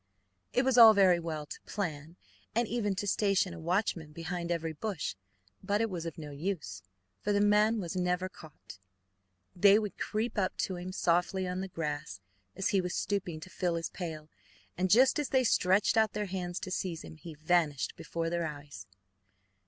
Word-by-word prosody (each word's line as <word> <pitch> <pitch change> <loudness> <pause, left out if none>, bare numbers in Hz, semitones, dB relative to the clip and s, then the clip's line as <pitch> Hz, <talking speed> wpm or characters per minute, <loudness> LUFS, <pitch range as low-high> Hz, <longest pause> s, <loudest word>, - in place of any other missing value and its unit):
It 250 - +2
was 260 -2 +4
all 225 -2 +10
very 185 -3 +5
well 160 -3 -4
to - - -9
plan, 160 -5 -4 0.4
and 235 0 +2
even 210 -4 -1
to 205 +2 -3
station 195 -3 +1
a 170 - -8
watchman 165 -2 -1
behind 170 +1 -4
every 165 -1 -2
bush, 195 +1 -3 0.5
but 205 +1 0
it 225 -1 0
was 170 -2 -4
of 165 - -7
no 150 -2 -7
use, 145 - -4 0.4
for 210 - -1
the 205 - +3
man 210 +2 +4
was 175 -2 -4
never 180 0 0
caught. 155 - -14 0.8
They 200 +3 +6
would 210 -2 -3
creep 220 0 -2
up 185 -2 -1
to 185 - -2
him 180 +1 -6
softly 180 +1 +1
on 180 +1 -3
the 195 - -4
grass, 150 - -4 0.4
as 195 - -1
he 195 - +2
was 180 -1 -3
stooping 180 -6 -2
to 185 - -9
fill 175 -2 -1
his 165 0 -3
pail, 160 -4 -6 0.5
and 185 +1 0
just 255 +9 +5
as 295 - -1
they 260 -1 +3
stretched 195 -2 +3
out 220 -1 +3
their 210 - -2
hands 180 -2 -4
to 185 - -5
seize 175 -3 -3
him, 160 - -11
he 165 0 -10
vanished 155 -2 +1
before 165 0 -4
their 170 -1 0
eyes. 145 -4 -9
180 Hz, 190 wpm, -31 LUFS, 165-205 Hz, 0.8 s, all